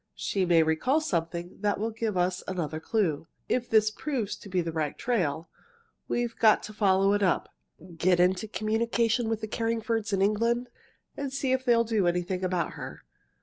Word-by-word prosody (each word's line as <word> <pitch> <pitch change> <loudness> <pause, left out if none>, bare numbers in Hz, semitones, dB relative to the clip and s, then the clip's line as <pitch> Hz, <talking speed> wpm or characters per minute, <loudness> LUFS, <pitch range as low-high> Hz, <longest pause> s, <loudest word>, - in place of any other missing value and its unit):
She 190 -2 -1
may 165 -2 +5
recall 160 - +2
something 170 - -3
that 205 -1 0
will 225 +2 -1
give 220 -3 -2
us 180 +1 0
another 165 -4 -3
clue. 160 -4 -1 0.2
If 245 -1 -1
this 215 -1 +4
proves 235 -4 -3
to 200 - -12
be 185 -1 0
the 165 -1 -3
right 155 -2 -2
trail, 165 - -1 0.6
we've 240 -1 -1
got 220 -2 +5
to 215 - -8
follow 195 -1 +3
it 205 - +1
up, 185 -3 +1 0.4
get 175 +1 +3
into 185 +4 +2
communication 225 +2 0
with 225 -1 -1
the 220 - -3
Carringfords 225 -1 -1
in 195 -1 +2
England, 230 +4 +1 0.5
and 280 -2 -4
see 270 -1 -1
if 260 0 0
they 240 -2 +5
will 230 - +4
do 220 -5 +1
anything 180 +1 -1
about 180 -3 0
her. - - -8
210 Hz, 185 wpm, -28 LUFS, 180-230 Hz, 0.6 s, may